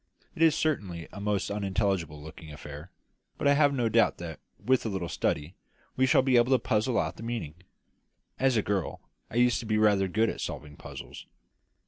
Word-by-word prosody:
It -, -, -7 dB
is 165 Hz, -2 st, +6 dB
certainly 95 Hz, -, -1 dB
a 100 Hz, -, -7 dB
most 100 Hz, -1 st, -1 dB
unintelligible 95 Hz, -6 st, -1 dB
looking 80 Hz, +1 st, -10 dB
affair; 75 Hz, +2 st, -9 dB, 0.5 s
but -, -, 0 dB
I 140 Hz, -, +6 dB
have 145 Hz, 0 st, +4 dB
no 125 Hz, -4 st, 0 dB
doubt 115 Hz, +1 st, +3 dB
that, 85 Hz, -2 st, -7 dB, 0.2 s
with 130 Hz, 0 st, +2 dB
a 115 Hz, -, -2 dB
little 95 Hz, -4 st, -3 dB
study, 75 Hz, 0 st, -1 dB, 0.4 s
we 130 Hz, 0 st, +3 dB
shall 130 Hz, -, +5 dB
be 130 Hz, -2 st, +4 dB
able 120 Hz, +2 st, +4 dB
to -, -, +6 dB
puzzle 110 Hz, +1 st, 0 dB
out -, -, -1 dB
the -, -, -10 dB
meaning. 115 Hz, -10 st, -4 dB, 0.9 s
As 130 Hz, -2 st, +3 dB
a 105 Hz, -, +2 dB
girl 95 Hz, -4 st, -2 dB, 0.3 s
I -, -, -10 dB
used 120 Hz, -2 st, +4 dB
to 115 Hz, -, -7 dB
be 110 Hz, 0 st, +1 dB
rather 105 Hz, -3 st, +4 dB
good 110 Hz, +4 st, +1 dB
at -, -, -7 dB
solving 75 Hz, -1 st, -6 dB
puzzles." -, -, -10 dB
105 Hz, 195 wpm, -28 LUFS, 90-120 Hz, 0.9 s, is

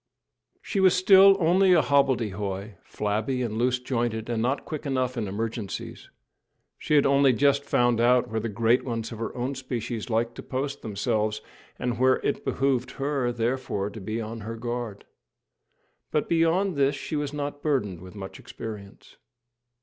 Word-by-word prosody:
She -, -, -2 dB
was 190 Hz, -2 st, +5 dB
still 195 Hz, +1 st, +7 dB
only 185 Hz, +2 st, +4 dB
a 170 Hz, -, +6 dB
hobbledehoy, 110 Hz, -8 st, 0 dB
flabby 110 Hz, +5 st, -2 dB
and 110 Hz, -3 st, -3 dB
loose 125 Hz, +1 st, +2 dB
jointed, 120 Hz, -3 st, -2 dB
and 115 Hz, -1 st, -1 dB
not 130 Hz, +4 st, -1 dB
quick 155 Hz, -1 st, -5 dB
enough 130 Hz, -2 st, 0 dB
in 115 Hz, -4 st, -2 dB
emergencies. 110 Hz, +1 st, -5 dB, 0.7 s
She 150 Hz, -, 0 dB
had 145 Hz, -, +5 dB
only 140 Hz, -1 st, +4 dB
just 140 Hz, +3 st, +3 dB
found 120 Hz, -4 st, +2 dB
out 125 Hz, +1 st, +4 dB
where 110 Hz, +1 st, -2 dB
the 115 Hz, +1 st, -3 dB
great 115 Hz, +3 st, +2 dB
ones 115 Hz, -2 st, -4 dB
of 115 Hz, -, -7 dB
her 115 Hz, -, -3 dB
own 125 Hz, +3 st, -2 dB
species 125 Hz, -4 st, -4 dB
liked 115 Hz, +1 st, 0 dB
to -, -, -5 dB
post 140 Hz, +2 st, -4 dB
themselves, 110 Hz, 0 st, -1 dB, 0.4 s
and 120 Hz, -2 st, -2 dB
where 130 Hz, 0 st, +5 dB
it -, -, -1 dB
behoved 135 Hz, -2 st, 0 dB
her, 135 Hz, -3 st, -1 dB
therefore, 120 Hz, -4 st, -2 dB
to 105 Hz, -, -9 dB
be 110 Hz, +4 st, -3 dB
on 115 Hz, +1 st, -5 dB
her 110 Hz, +2 st, -6 dB
guard; 120 Hz, -3 st, -5 dB, 1.0 s
but 150 Hz, -, 0 dB
beyond 170 Hz, +3 st, +2 dB
this 140 Hz, 0 st, +2 dB
she 145 Hz, -, -5 dB
was 145 Hz, -1 st, -2 dB
not 145 Hz, -1 st, -4 dB
burdened 105 Hz, -, -1 dB
with 95 Hz, +2 st, -11 dB
much 95 Hz, -2 st, -8 dB
experience. 105 Hz, -3 st, -9 dB
120 Hz, 165 wpm, -26 LUFS, 110-140 Hz, 1.0 s, still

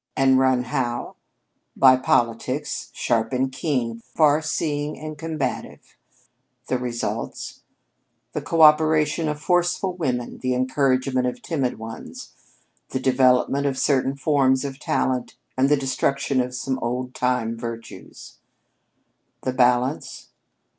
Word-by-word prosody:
And 130 Hz, -1 st, +4 dB
run 130 Hz, -1 st, +3 dB
how? 120 Hz, 0 st, -3 dB, 0.6 s
By 130 Hz, -1 st, +7 dB
politics, 130 Hz, +3 st, -1 dB
sharp 115 Hz, -2 st, 0 dB
and 130 Hz, +1 st, 0 dB
keen, 125 Hz, -5 st, -2 dB
far 150 Hz, +5 st, +2 dB
seeing 150 Hz, -1 st, -2 dB
and 155 Hz, +2 st, -7 dB
combative. 155 Hz, -4 st, -5 dB, 0.7 s
The 130 Hz, -, -1 dB
results? 120 Hz, -2 st, -4 dB, 0.7 s
The -, -, -2 dB
coöperation 155 Hz, 0 st, +4 dB
of 150 Hz, 0 st, -3 dB
forceful 180 Hz, +3 st, +1 dB
women, 125 Hz, -8 st, -3 dB
the 130 Hz, -1 st, -1 dB
encouragement 130 Hz, 0 st, +1 dB
of 125 Hz, -, -5 dB
timid 135 Hz, -7 st, -1 dB
ones; 115 Hz, 0 st, -9 dB, 0.6 s
the 130 Hz, -, -2 dB
development 130 Hz, +2 st, +3 dB
of 135 Hz, -1 st, -2 dB
certain 135 Hz, -1 st, +1 dB
forms 135 Hz, -1 st, +2 dB
of 135 Hz, 0 st, -6 dB
talent, 130 Hz, -3 st, -1 dB, 0.2 s
and 130 Hz, +1 st, +2 dB
the 150 Hz, -, +4 dB
destruction 135 Hz, 0 st, 0 dB
of 125 Hz, 0 st, -4 dB
some 130 Hz, +1 st, -2 dB
old 125 Hz, +1 st, -3 dB
time 125 Hz, -2 st, 0 dB
virtues. 115 Hz, 0 st, -9 dB, 1.0 s
The 130 Hz, -, -1 dB
balance? 125 Hz, +2 st, +1 dB
130 Hz, 120 wpm, -23 LUFS, 125-145 Hz, 1.0 s, By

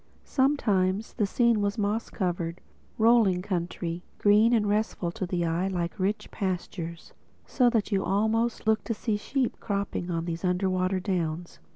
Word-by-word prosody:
Sometimes 215 Hz, -8 st, +1 dB
the 210 Hz, -4 st, 0 dB
scene 235 Hz, 0 st, +2 dB
was 205 Hz, +1 st, -1 dB
moss 210 Hz, +2 st, -1 dB
covered, 175 Hz, -3 st, -2 dB, 0.4 s
rolling 220 Hz, -5 st, +4 dB
country, 175 Hz, -2 st, -3 dB, 0.2 s
green 210 Hz, +3 st, +5 dB
and 220 Hz, -3 st, +3 dB
restful 205 Hz, -4 st, 0 dB
to 185 Hz, 0 st, -4 dB
the 175 Hz, -1 st, -1 dB
eye 170 Hz, +3 st, 0 dB
like 175 Hz, 0 st, -3 dB
rich 200 Hz, +3 st, -1 dB
pastures; 175 Hz, -3 st, -4 dB, 0.3 s
so 250 Hz, -3 st, +3 dB
that 225 Hz, -3 st, 0 dB
you 195 Hz, -1 st, +1 dB
almost 220 Hz, +3 st, 0 dB
looked 220 Hz, 0 st, +2 dB
to 230 Hz, -, -2 dB
see 215 Hz, 0 st, -1 dB
sheep 250 Hz, +4 st, -2 dB
cropping 200 Hz, -4 st, -3 dB
on 165 Hz, -1 st, -2 dB
these 170 Hz, 0 st, -4 dB
underwater 185 Hz, 0 st, +1 dB
downs. 175 Hz, -3 st, -3 dB
195 Hz, 155 wpm, -27 LUFS, 180-220 Hz, 0.4 s, green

